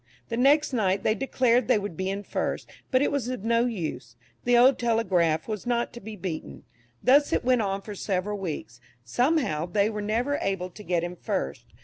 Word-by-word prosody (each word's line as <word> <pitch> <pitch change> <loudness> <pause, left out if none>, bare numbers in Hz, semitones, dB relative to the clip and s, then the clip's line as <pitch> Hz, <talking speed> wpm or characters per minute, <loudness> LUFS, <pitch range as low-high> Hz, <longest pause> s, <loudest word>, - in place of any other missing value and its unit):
The 230 - -2
next 285 +3 +4
night 195 -4 +1
they 215 - +3
declared 250 -1 +2
they 250 - +4
would 205 -4 -4
be 185 +3 -2
in 200 +1 -3
first; - - -3 0.2
but 260 +1 +3
it - - +1
was 280 -5 -1
of 250 -5 -4
no 235 +1 +2
use, 165 - -5 0.3
the 245 0 +5
old 255 +2 +6
"Telegraph" 185 -9 +1
was 215 0 -4
not 240 -1 0
to 240 - -8
be 220 +1 -8
beaten. 160 - -6 0.4
Thus 285 +3 +5
it - - 0
went 250 -2 +4
on 195 -1 -2
for 210 - -7
several 200 +1 -2
weeks; 145 -9 -6 0.2
somehow 240 - +1
they 200 +4 +1
were 210 -1 -4
never 235 +7 0
able 185 -2 -2
to 210 - -12
get 175 -4 0
in 175 +1 -4
first. 70 - -3
210 Hz, 205 wpm, -26 LUFS, 185-245 Hz, 0.4 s, old